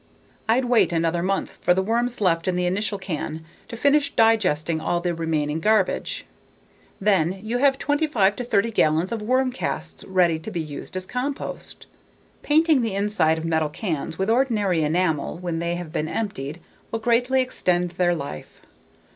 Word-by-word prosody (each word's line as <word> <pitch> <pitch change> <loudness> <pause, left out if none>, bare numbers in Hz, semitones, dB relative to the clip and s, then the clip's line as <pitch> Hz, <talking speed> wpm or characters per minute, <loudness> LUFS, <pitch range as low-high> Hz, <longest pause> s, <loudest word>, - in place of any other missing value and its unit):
I'd 250 +3 +3
wait 240 -5 +3
another 165 0 0
month 195 +2 -2
for 180 - +3
the 190 - +1
worms 235 +4 0
left 175 -3 +1
in 185 - +1
the 180 0 0
initial 200 +3 -1
can 160 -4 -5 0.2
to 230 - -7
finish 285 +3 +3
digesting 175 -8 +2
all 175 - 0
the 175 0 -1
remaining 160 -2 -1
garbage. 215 +5 +1 0.7
Then, 190 -2 +2
you 235 +3 -1
have 270 0 +4
25 290 -11 +1
to 250 - -3
30 230 -1 +1
gallons 160 -3 +2
of 230 -2 -3
worm 255 +4 +1
casts 80 - -4
ready 175 -4 +2
to 160 - -7
be 185 -5 -4
used 155 +3 -6
as 185 - -3
compost. 255 +6 -5 0.6
Painting 310 -2 +3
the 225 -4 -2
inside 195 -6 +2
of 160 - -4
metal 160 -2 +1
cans 160 -2 -4
with 190 +3 0
ordinary 215 -9 +2
enamel 160 0 0
when 175 -2 -3
they 170 +1 -1
have 175 -3 -7
been 155 - -1
emptied 160 -7 -4 0.3
will 225 - -2
greatly 245 +3 +2
extend 180 -9 0
their 175 0 +1
life. 140 - -8
185 Hz, 170 wpm, -23 LUFS, 165-230 Hz, 0.7 s, have